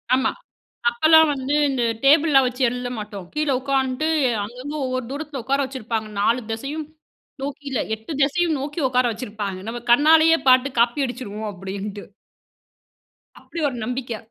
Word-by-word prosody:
ஆமா. 260 - +1 0.6
அப்பலாம் 315 +5 +5
வந்து, 270 +1 -2
இந்த 265 -3 -1 0.2
டேபிள்லாம் 285 -2 +5
வச்சு 250 +2 -3
எழுத 245 0 -4
மாட்டோம். 205 -3 -7
கீழ 305 -1 0
உக்காந்ட்டு, 270 +2 0 0.4
அங்கங்க 250 +7 -7
ஒவ்வொரு 255 0 -2
தூரத்தில, 285 -1 -5
உக்கார 275 +1 +1
வச்சிருப்பாங்க. 230 -4 -4
4 230 +4 +2
தெசையும் 280 +7 -4 0.6
நோக்கி 285 +1 -5
இல்ல, 255 - -1
8 220 +7 -8
தெசையும் 315 +3 +1
நோக்கி 295 +4 -4
உக்கார 255 0 +2
வச்சிருப்பாங்க. 205 -4 -5
நம்ம 240 +1 -4
கண்ணாலேயே 320 +4 +6
பாத்து 255 +1 +6
காப்பி 240 +4 +2
அடிச்சிருவோம், 220 -4 -6
அப்படின்ட்டு. 195 +2 -6 1.4
அப்படி 335 - -8
ஒரு 255 - -7
நம்பிக்கை. 245 -1 -4
255 Hz, 140 wpm, -22 LUFS, 225-290 Hz, 1.4 s, கண்ணாலேயே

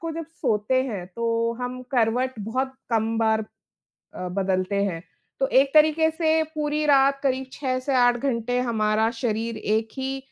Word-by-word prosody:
को 330 -1 -4
जब 325 0 -5
सोते 255 -5 0
हैं, 205 -9 -5
तो 230 +3 -1
हम 250 0 -4
करवट 245 +2 +1
बहुत 255 +6 -2 0.2
कम 225 0 +1
बार 220 -1 +2 0.7
अ, 180 0 -5
बदलते 190 +1 0
हैं, 170 -4 -3 0.4
तो 270 - +3
एक 270 +1 +4
तरीके 310 +1 +5
से 320 -1 +1
पूरी 300 0 -1
रात 275 -1 +4
करीब 265 -1 0
6 255 -2 -2
से 270 +1 -2
8 245 -1 +4
घंटे 245 -1 -1
हमारा 220 -2 +1
शरीर 230 -1 -1
एक 220 +1 0
ही 265 +1 -2
245 Hz, 165 wpm, -24 LUFS, 220-270 Hz, 0.7 s, तरीके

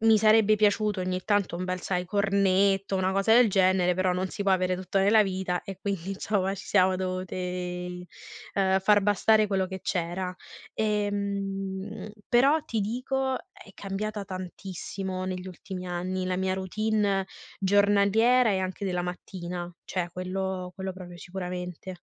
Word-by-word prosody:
mi 225 0 +6
sarebbe 215 0 +5
piaciuto 210 -1 +2
ogni 185 0 -1
tanto 205 -5 +1
un 180 - -3
bel, 185 0 -2
sai, 180 -1 -1
cornetto, 195 0 +2
una 185 0 +1
cosa 195 +3 +3
del 240 -2 +6
genere, 185 -2 +3
però 185 0 +1
non 185 +1 -1
si 200 - -4
può 195 - +4
avere 185 0 +1
tutto 185 +2 -2
nella 210 +3 +5
vita 185 -2 -2
e 195 -1 -8
quindi 195 -2 -3
insomma 195 -1 -1
ci 195 - -9
siamo 185 -2 +4
dovute, 185 0 -3 1.2
ehm, 190 -1 +3
far 205 +2 +5
bastare 215 +1 +4
quello 190 -2 +1
che 190 0 -7
c'era. 180 0 -2 0.4
Ehm. 200 -1 -2 0.2
Però, 275 +6 +4
ti 225 -2 -2
dico, 260 +4 -1 0.2
è 195 - -15
cambiata 205 +1 -4
tantissimo 185 0 -5
negli 185 0 -4
ultimi 185 0 -7
anni 185 +1 -2
la 185 0 -1
mia 190 0 0
routine 200 0 0 0.3
giornaliera 205 +5 +4
e 190 - +1
anche 190 +2 -4
della 180 -2 -1
mattina, 180 0 -6
cioè 175 -2 -3
quello 185 0 -3
quello 190 -1 -4
proprio 180 -1 -10
sicuramente. 180 0 -6
190 Hz, 155 wpm, -27 LUFS, 185-205 Hz, 1.2 s, mi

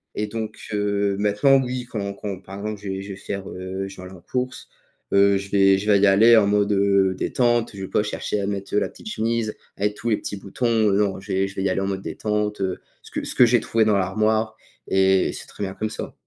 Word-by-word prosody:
et 105 - -1
donc 110 0 -5 0.2
heu, 100 -1 0
maintenant, 105 +7 +4
oui, 125 0 -4
quand 100 -4 -3
quand, 100 -2 -5
par 95 0 -10
exemple, 105 0 -5
je 100 - -6
vais 95 0 -3
je 100 - -10
vais 100 - -5
faire, 100 0 -6
heu, 95 +1 -5
je 95 - -10
vais - - -9
aller 90 - -9
en 90 - -13
course, 125 +6 -4 0.4
heu, 100 0 +5
je 100 0 -6
vais 95 -1 +5
je 105 +2 -3
vais 100 -1 +5
y 100 - +5
aller 110 +4 +7
en 105 - +5
mode, 105 0 +2
heu, 100 -1 +3
détente, 120 +1 +1
je 95 - -7
vais - - -4
pas 105 - +1
chercher 105 0 -3
à - - -1
mettre, 100 -1 -4
heu, - - +5
la - - -1
petite - - -10
chemise 115 - -1 0.2
avec 105 +1 0
tous 115 - -3
les 110 - +2
petits - - -5
boutons, 100 +5 -3 0.2
heu, 100 - +2
non, 100 -2 +1
je 95 +1 -9
vais 95 +1 +1
je 95 - -11
vais 95 - -2
y 100 - +1
aller - - 0
en 95 - -1
mode 95 -1 -3
détente, 105 -1 -2
heu, 95 -1 -2 0.2
ce - - -13
que - - -3
ce - - -3
que 125 - +7
j'ai 120 +1 +4
trouvé 110 -1 +1
dans 105 -2 +3
l'armoire 110 +3 +1 0.3
et 95 -1 +3
c'est - - -9
très - - -7
bien 95 -1 -3
comme 110 - -2
ça. - - -6
100 Hz, 265 wpm, -23 LUFS, 95-110 Hz, 0.4 s, aller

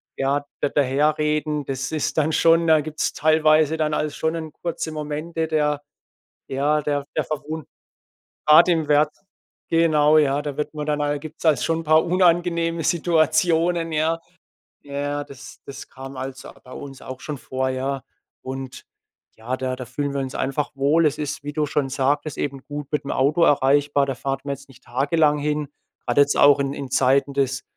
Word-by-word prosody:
ja, 140 +1 0 0.2
da 145 - +1
daher 145 +2 +2
reden. 150 -1 -1
Das 135 +1 -4
ist 155 0 -2
dann 155 0 +2
schon 165 +1 +4
da 160 -1 +5
gibt's 155 +1 -3
teilweise 155 0 +3
dann 155 -1 0
also 150 -1 -2
schon 160 +1 -1
'n 160 -2 -5
kurze 165 -2 -4
Momente 155 +2 -3
der 150 -2 0 0.7
ja, 145 +3 +1
der 145 -1 -1
der - - 0
Verwun 155 0 -5 0.8
grad 155 +4 +7
im 165 -4 +1
Wirts 150 +1 +2 0.5
genau 155 -2 +4
ja, 145 -1 +2
da 145 -2 -5
wird 150 - -3
man 150 -1 -4
dann 150 -1 0
ja, 145 - 0
da 145 0 -1
gibt's 155 +3 -11
halt 155 -6 +3
schon 165 0 0
'n - - -9
paar 155 0 +4
unangenehme 170 -2 +2
Situationen, 165 +1 +2
ja. 160 +2 +1 0.7
Ja, 145 0 -3
das 140 -1 -12
das 140 0 -9
kam, 135 0 -10
also, 130 0 -7
bei 130 - -13
uns 135 -1 -9
auch 130 0 -8
schon 150 -2 -6
vor, 130 +1 -2
ja. 130 +1 -2 0.4
Und 130 0 -7 0.5
ja, 120 +4 -4
da 130 0 -3
da 130 - -6
fühlen 145 +4 -3
wir 140 - -1
uns 130 -1 -4
einfach 135 +2 -2
wohl. 145 +4 +3
Es 150 0 0
ist, 145 -1 -4
wie 145 - -4
du 150 0 0
schon 140 -1 -1
sagtest, 140 +3 -1
eben 140 -2 -4
gut 145 -1 -6
mit 150 -2 -1
dem 140 - -4
Auto 145 +6 +2
erreichbar. 145 0 +3
Da 135 - -2
fahrt 135 +3 -3
man 140 -1 -2
jetzt 140 +1 -17
nicht 130 -1 -18
tagelang 145 +4 +1
hin. 150 0 -2 0.4
Grade 125 +3 +4
jetzt 140 0 +1
auch 145 0 +6
in 140 0 -1
in 140 -2 -6
Zeiten 135 +2 +2
des 135 -1 0
145 Hz, 190 wpm, -22 LUFS, 135-155 Hz, 0.8 s, grad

